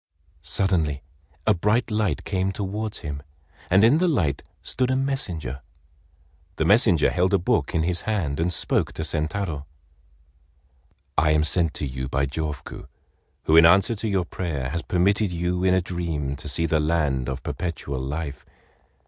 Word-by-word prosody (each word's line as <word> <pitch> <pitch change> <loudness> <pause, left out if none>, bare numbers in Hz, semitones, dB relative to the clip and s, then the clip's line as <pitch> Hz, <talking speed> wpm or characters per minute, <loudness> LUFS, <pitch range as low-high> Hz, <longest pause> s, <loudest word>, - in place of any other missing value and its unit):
Suddenly 75 -3 0 0.4
a 110 - +5
bright 105 +6 +1
light 105 -9 0
came 95 0 -1
towards 105 +2 -4
him, 70 -1 -4 0.5
and 95 +3 +5
in 130 +8 +5
the 180 - +3
light 80 - +1 0.2
stood 125 -1 -1
a 130 - +2
messenger. 90 - -3 0.9
The - - 0
messenger 100 - +5
held 90 +2 +2
a - - +5
book 85 - 0
in 80 - +2
his 85 +1 0
hand, 90 -10 -1
and 85 +2 +1
spoke - - 0
to 80 - -4
Sentaro: 80 -1 -2 1.5
"I 75 - +3
am 75 0 +3
sent 80 0 +1
to - - -3
you 65 -1 -4
by 70 0 +1
Jofuku, 75 0 -5 0.6
who 80 - +3
in 80 0 +9
answer 95 +6 +5
to 110 +1 -3
your 95 -4 +1
prayer, 75 -8 -3
has 85 +4 -2
permitted 95 +4 +1
you 90 +1 -1
in 95 0 +4
a 95 - +2
dream 85 -6 -3
to 75 - -6
see 85 +3 0
the 80 -1 +2
land 75 -5 0
of 65 - -5
Perpetual 80 -6 -4
Life. 70 +2 -4
85 Hz, 165 wpm, -24 LUFS, 75-95 Hz, 1.5 s, in